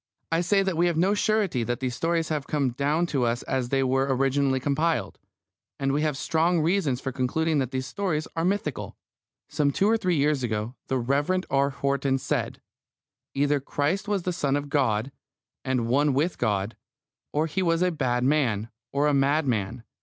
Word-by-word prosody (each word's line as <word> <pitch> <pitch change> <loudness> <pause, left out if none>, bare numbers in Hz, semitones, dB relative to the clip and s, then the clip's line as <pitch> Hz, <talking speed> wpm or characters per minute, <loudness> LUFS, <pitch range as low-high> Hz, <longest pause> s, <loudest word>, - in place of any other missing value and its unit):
I 165 +1 +2
say 195 +3 +2
that 190 -2 -1
we 170 +2 +3
have 170 -2 0
no 185 +5 +3
surety 205 - +1
that 120 +1 -2
these 130 -2 -2
stories 165 +4 0
have 150 -3 -2
come 140 -4 0
down 145 +6 +1
to 140 -7 -1
us 120 0 0
as 130 -2 -2
they 135 0 +2
were 135 +1 +1
originally 135 0 +2
compiled, 155 +5 -1 0.6
and 135 0 +1
we 145 +2 +1
have 150 -3 0
strong 165 +4 +1
reasons 160 -6 +1
for 135 - -4
concluding 150 +5 0
that 130 -3 -1
these 130 0 -3
stories 155 +1 -2
are 165 - 0
mythical. 180 -7 -2 0.5
Some 145 -1 +1
two 195 +8 +1
or 225 +1 +4
three 185 -5 0
years 145 -1 +2
ago 110 -1 -2
the 130 - 0
Rev. 145 +9 +1
R. 140 +1 +3
Horton 140 -1 0
said: 130 - -2 0.8
"Either 145 +1 +2
Christ 150 +9 -1
was 205 -3 0
the 180 - -1
Son 145 -5 0
of 145 0 -3
God, 130 -4 +1 0.5
and 130 -3 0
one 140 +4 +2
with 160 +6 0
God, 100 +1 0 0.6
or 150 +2 +1
He 165 +4 -2
was 170 -1 +2
a 180 - +2
bad 125 -6 0
man, 125 -7 +1 0.2
or 140 +1 +1
a 150 - +3
madman. 130 -6 +1
140 Hz, 190 wpm, -26 LUFS, 130-165 Hz, 0.8 s, or